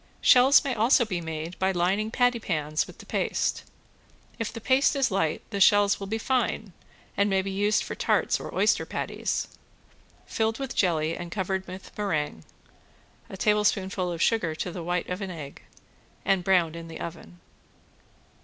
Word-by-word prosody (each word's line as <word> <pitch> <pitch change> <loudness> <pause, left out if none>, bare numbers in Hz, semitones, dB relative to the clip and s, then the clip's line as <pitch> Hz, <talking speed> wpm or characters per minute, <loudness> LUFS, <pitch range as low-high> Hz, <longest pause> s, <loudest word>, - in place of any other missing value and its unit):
Shells 260 +3 +6
may 275 -3 -1
also 235 +2 +4
be 185 -5 -3
made 160 +1 -6
by 190 0 +2
lining 190 +4 0
pattypans 195 - 0
with - - -13
the - - -13
paste; - - -1 0.8
if 230 - -2
the - - -7
paste 260 +5 +3
is 270 -5 +1
light 165 -5 0
the 200 - -2
shells 205 0 +5
will 195 - -6
be 220 +3 -2
fine 225 -5 -1 0.4
and 200 +1 +2
may 190 -1 +1
be 195 - -4
used 205 +2 +1
for - - -5
tarts - - +1
or - - -7
oyster - - +3
patties. - - -3 0.8
Filled 220 0 -1
with 270 -1 -5
jelly 165 -3 +1
and 175 -1 -7
covered 190 -1 -2
with 185 +1 -10
meringue 155 - -2 0.9
(a 190 - -8
tablespoonful 195 -3 +1
of 170 -1 -1
sugar 175 -9 +1
to 180 - -4
the 175 - -6
white 175 +1 -2
of 180 +2 -4
an 195 - -4
egg), 155 -6 -8 0.6
and 195 -2 +2
browned 175 -4 +2
in 165 0 -8
the 165 - -9
oven. 125 - -8
190 Hz, 170 wpm, -26 LUFS, 170-215 Hz, 0.9 s, Shells